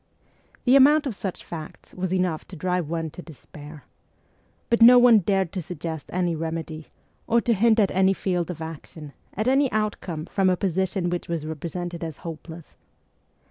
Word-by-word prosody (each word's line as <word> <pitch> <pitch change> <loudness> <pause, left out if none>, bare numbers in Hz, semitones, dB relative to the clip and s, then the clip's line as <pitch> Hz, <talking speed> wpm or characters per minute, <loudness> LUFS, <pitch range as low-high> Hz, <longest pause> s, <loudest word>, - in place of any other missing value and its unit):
The 255 +1 +5
amount 290 +3 +6
of 265 - -2
such 190 -2 -5
facts 160 -3 -9
was 185 -1 -3
enough 180 -4 -1
to 185 - -10
drive 180 -1 -2
one 165 -1 -3
to 180 - -9
despair. 150 -2 -12 0.9
But 235 - +2
no 245 +2 +9
one 240 -3 +7
dared 190 -2 0
to 190 - -4
suggest 160 -2 -6
any 175 -2 0
remedy, 160 -1 -5 0.4
or 235 - +3
to 235 - +2
hint 225 +2 +3
at 200 -3 +3
any 190 +1 +3
field 180 -3 -2
of 165 -2 -5
action, 155 -2 -9 0.2
at 215 +4 -1
any 270 +1 +3
outcome 200 -7 -2
from 190 +1 +1
a 180 - +1
position 190 -1 -1
which 175 - -3
was 165 -3 -3
represented 170 +2 -5
as 160 -3 -5
hopeless. 165 0 -9
180 Hz, 175 wpm, -24 LUFS, 160-200 Hz, 0.9 s, no